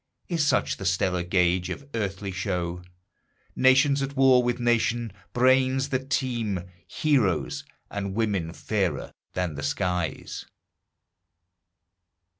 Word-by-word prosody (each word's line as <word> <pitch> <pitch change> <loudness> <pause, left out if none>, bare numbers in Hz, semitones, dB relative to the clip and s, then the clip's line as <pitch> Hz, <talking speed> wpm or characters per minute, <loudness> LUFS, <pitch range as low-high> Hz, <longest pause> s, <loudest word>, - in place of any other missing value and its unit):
Is 170 -3 +1
such 150 - +1
the 100 - -7
stellar 90 0 +1
gauge 90 0 +1
of 140 +9 -6
earthly 100 -3 -3
show, 90 -2 -2 0.7
Nation 130 +2 +5
at 135 +1 -3
war 130 -2 +6
with 120 0 -1
nation, 120 -2 +1 0.2
brains 130 +2 +3
that 135 0 -2
teem, 115 -9 -1 0.3
Heroes, 100 - +1 0.3
and 100 -1 -3
women 100 -7 0
fairer 100 0 -2 0.2
than 90 -3 -1
the 70 - -6
skies? 90 +3 -2
105 Hz, 110 wpm, -26 LUFS, 90-130 Hz, 0.7 s, war